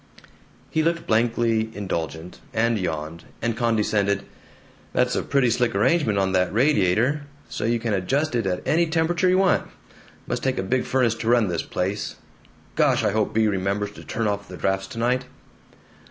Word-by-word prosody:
He 160 - +2
looked 170 +1 0
blankly 115 -1 +1
indulgent, 85 -3 -4 0.2
and 115 0 +2
yawned, 80 -1 -4
and 115 0 -1
condescended, 105 -4 +1 0.7
"That's 125 0 +2
a - - +1
pretty 135 -4 +2
slick 120 -2 +1
arrangement 115 0 +2
on 95 -1 +1
the 90 -1 +2
radiator, 125 +3 +2 0.2
so - - -3
you 115 +1 +1
can 115 -1 -1
adjust 135 +11 0
it 115 -4 0
at 90 -1 -3
any 170 +2 +3
temperature 170 +2 +1
you 185 - +4
want. 190 -1 +2 0.6
Must - - -3
take 130 -1 0
a 95 - -1
big 125 +6 0
furnace 125 -4 +2
to 115 0 -3
run 120 -4 +4
this 85 -2 -1
place. 100 +3 -3 0.6
Gosh, - - +3
I 105 - +2
hope 110 0 0
Bea 110 0 +2
remembers 100 0 -1
to - - -12
turn 115 - -3
off 100 0 -2
the 90 - -9
drafts 95 0 -1
tonight." 125 +4 -1
110 Hz, 170 wpm, -24 LUFS, 100-125 Hz, 0.7 s, you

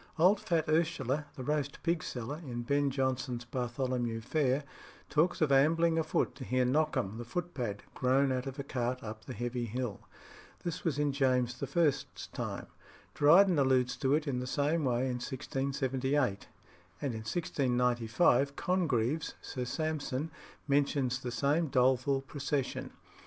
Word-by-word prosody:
Old 185 +5 +5
fat 165 -5 0
Ursula, 155 -3 +1
the 130 - -6
roast 145 0 -2
pig 170 -1 +1
seller 125 +5 -5
in 120 -4 -4
Ben 140 +3 +2
Jonson's 130 -2 -1
Bartholomew 120 -1 -2
Fair 135 +2 +1 0.5
talks 160 +4 +2
of 155 -3 +3
ambling 165 +4 +4
afoot 160 - 0
to 135 - -7
hear 130 0 +1
Knockhem 130 -6 0
the - - -4
footpad 120 - -4
groan 130 +2 +2
out 130 +1 -1
of 135 +1 -6
a 140 - -3
cart 125 -2 -2
up 110 0 -7
the 130 - -6
Heavy 120 0 -2
Hill. 120 -1 -3 0.6
This 170 -2 -4
was 155 -4 0
in 145 -1 +2
James 125 -3 +1
I.'s 165 -6 +2 0.3
time. - - -4 0.5
Dryden 170 +3 +6
alludes 130 -2 +3
to 135 -1 +2
it 155 0 -1
in 130 -3 0
the 125 - -4
same 150 +3 +1
way 120 -1 +1
in 125 -1 -2
1678, 135 -2 -1 0.5
and 140 -4 -2
in 110 - -4
1695 125 +1 +1
Congreve's 155 -5 0
Sir 125 -1 -5
Sampson 155 +1 -2 0.4
mentions 140 -2 +1
the 125 - -4
same 145 +7 +1
doleful 130 +1 +2
procession. 140 0 -3
135 Hz, 145 wpm, -32 LUFS, 125-150 Hz, 0.6 s, Dryden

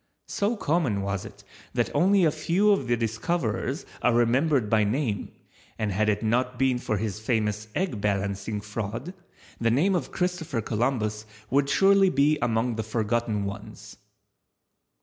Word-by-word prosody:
So 205 +4 0
common 145 - 0
was 100 -1 -3
it, - - -12 0.3
that - - 0
only 190 0 +4
a 155 - +4
few 170 +7 +2
of 195 -11 +1
the 120 0 +2
discoverers 115 - -2 0.2
are 115 - +3
remembered 125 +2 +2
by 110 0 +3
name, 110 -1 -1 0.5
and 105 -2 -1
had 105 +3 +1
it 105 +1 0
not 125 +3 0
been 130 -1 +2
for 110 - -1
his 105 -1 -3
famous 110 -2 -1
egg 160 - -1
balancing 100 +1 -1
fraud 115 - -5 0.5
the 115 - +2
name 155 +12 +3
of 180 - -2
Christopher 180 -8 -2
Columbus 110 -1 -1 0.2
would 140 +1 +2
surely 195 +5 +5
be 150 0 +2
among 115 0 0
the 110 - -1
forgotten 110 -1 -1
ones. 100 0 -8
120 Hz, 150 wpm, -26 LUFS, 105-150 Hz, 0.5 s, surely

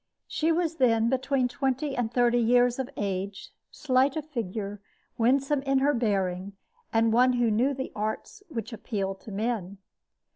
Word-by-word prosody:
She 320 +1 0
was 330 -1 0
then 230 -3 +3
between 265 0 +1
twenty 270 +3 -1
and 235 -3 -1
thirty 245 0 +3
years 245 +2 +3
of 260 0 -2
age, 195 0 -3 0.2
slight 265 0 +1
of 305 - -3
figure, 210 -7 -4 0.3
winsome 270 +4 +2
in 270 0 +1
her 280 +2 +3
bearing, 195 -5 -1 0.4
and 225 0 +3
one 250 +2 +5
who 240 -2 +2
knew 255 +6 +2
the 265 0 -5
arts 220 - -4
which 235 -5 -5
appeal 200 -3 -3
to 195 +3 -12
men. 200 -2 -2
240 Hz, 155 wpm, -27 LUFS, 215-270 Hz, 0.4 s, one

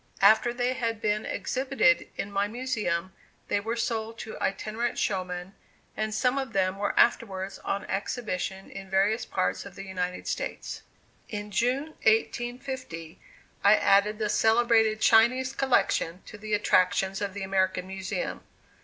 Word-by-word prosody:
After 220 +4 +6
they 245 +1 0
had 230 -3 -2
been 210 0 0
exhibited 260 -1 +1
in 200 - -4
my 200 0 +1
Museum, 210 -7 -2 0.4
they 205 - +2
were 225 +3 -3
sold 225 -1 -2
to 225 -1 -7
itinerant 220 +4 -2
showmen, 185 -1 -2 0.4
and 215 0 -2
some 250 +5 +1
of 265 -4 -5
them 190 0 +1
were 205 - 0
afterwards 195 -5 +1
on 200 +1 -3
exhibition 195 -2 -3
in 195 -1 -9
various 205 +4 +2
parts 185 - -1
of 195 -3 -11
the 195 - -7
United 180 -1 -4
States. - - -4 0.5
In 210 -1 -5
June 255 +8 +1
1850, 240 - -1 0.4
I 205 +1 +7
added 210 0 +3
the 215 -1 -1
celebrated 225 0 +3
Chinese 255 +4 +4
Collection 190 -9 +1
to - - -10
the 210 0 -2
attractions 190 -1 +2
of 200 -1 -3
the 200 - -4
American 190 -1 0
Museum. 190 - -4
210 Hz, 145 wpm, -27 LUFS, 195-235 Hz, 0.5 s, I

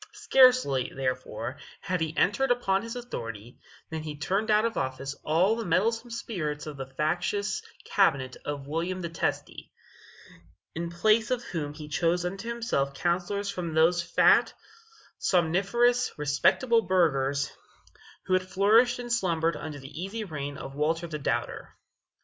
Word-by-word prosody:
Scarcely, 255 - +4
therefore, 130 0 -3 0.2
had 180 -3 -2
he 160 +1 -2
entered 270 +6 +2
upon 195 -6 +2
his 230 +2 -6
authority, 115 - -7 0.3
than 160 -1 -3
he 150 -1 -6
turned 195 +8 -1
out 215 +1 +4
of 230 - -1
office 130 +1 -3
all 175 +8 +3
the 230 - -3
meddlesome 225 +7 +1
spirits 175 -11 -4
of 150 -1 -6
the 135 -1 -6
factious 175 +8 -1 0.2
cabinet 135 -10 +2
of 145 -2 -4
William 170 +5 -2
the 170 - -3
Testy; 165 - -3 1.0
in 170 +1 -4
place 215 +6 +2
of 250 -1 -1
whom 150 -7 -4
he 150 -1 -8
chose 170 +3 0
unto 195 +6 -4
himself 225 - -1
counselors 185 +5 -1
from 170 -4 -4
those 170 +2 +4
fat, 170 - +4 0.6
somniferous, 200 +8 +2
respectable 155 - +3
burghers 140 -8 +1 0.7
who 185 - -1
had 185 0 +1
flourished 225 +7 +4
and 240 -1 -3
slumbered 170 -7 +1
under 150 -1 -6
the 145 +4 -9
easy 210 +4 -4
reign 145 -6 -5
of 135 - -8
Walter 160 +4 0
the 155 -2 -5
Doubter. 140 - -3
175 Hz, 145 wpm, -28 LUFS, 150-215 Hz, 1.0 s, Scarcely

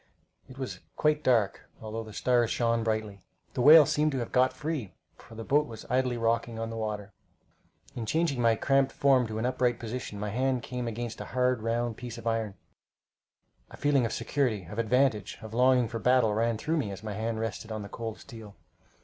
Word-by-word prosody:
It 130 - -12
was 130 -1 -5 0.2
quite 150 0 +1
dark, 115 -6 +1
although 110 0 -5
the 110 - -11
stars 120 +1 +2
shone 115 -1 +1
brightly. 110 -3 -2 0.3
The - - -1
whale 150 +3 +9
seemed 150 +3 +1
to - - -1
have 120 -2 -4
got 130 0 +4
free, 145 - -4 0.2
for 115 - -15
the 115 - -6
boat 150 +5 +2
was 110 -1 -9
idly 125 -1 +1
rocking 115 0 0
on 115 0 -4
the - - -5
water. 105 -2 -4 0.8
In 115 -2 -4
changing 155 -4 +1
my 115 -1 +4
cramped 135 +2 +2
form 130 -3 +3
to 110 0 -5
an 110 - -1
upright 125 -1 +1
position, 115 -3 -6
my 105 0 -3
hand 130 +1 0
came 125 -2 -4
against 115 0 -5
a - - -5
hard, 125 -2 +2
round 115 0 -1
piece 120 -2 -7
of 115 - -10
iron. 115 -3 -1 1.1
A - - -12
feeling 145 -3 +2
of - - -7
security, 125 -9 -1
of 105 +7 -7
advantage, 115 -3 +1
of 110 0 -8
longing 125 0 +4
for 115 0 -5
battle 125 -3 +3
ran 115 +1 +1
through 160 +8 -1
me 135 -9 -1
as 100 +1 -8
my 105 -1 -4
hand 110 +2 -2
rested 110 0 -4
on 110 -1 -4
the - - -7
cold 115 +1 -6
steel. 110 -6 -12
115 Hz, 205 wpm, -29 LUFS, 110-130 Hz, 1.1 s, whale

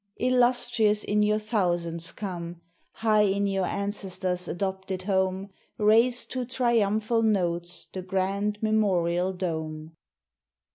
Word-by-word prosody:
Illustrious 240 -4 +2
in 210 +1 +1
your 210 0 +3
thousands 175 -6 -1
come! 175 -4 -6 0.3
High 215 -1 +2
in 200 0 +2
your 195 -2 0
ancestors' 190 -3 -3
adopted 190 0 -3
home, 190 0 0 0.3
Raise 230 +4 +3
to 255 -1 -4
triumphal 230 -3 +1
notes 175 -5 0
the 185 - -7
grand 195 +3 -1
memorial 185 -5 +1
dome. 160 -3 -4
195 Hz, 105 wpm, -27 LUFS, 180-215 Hz, 0.3 s, your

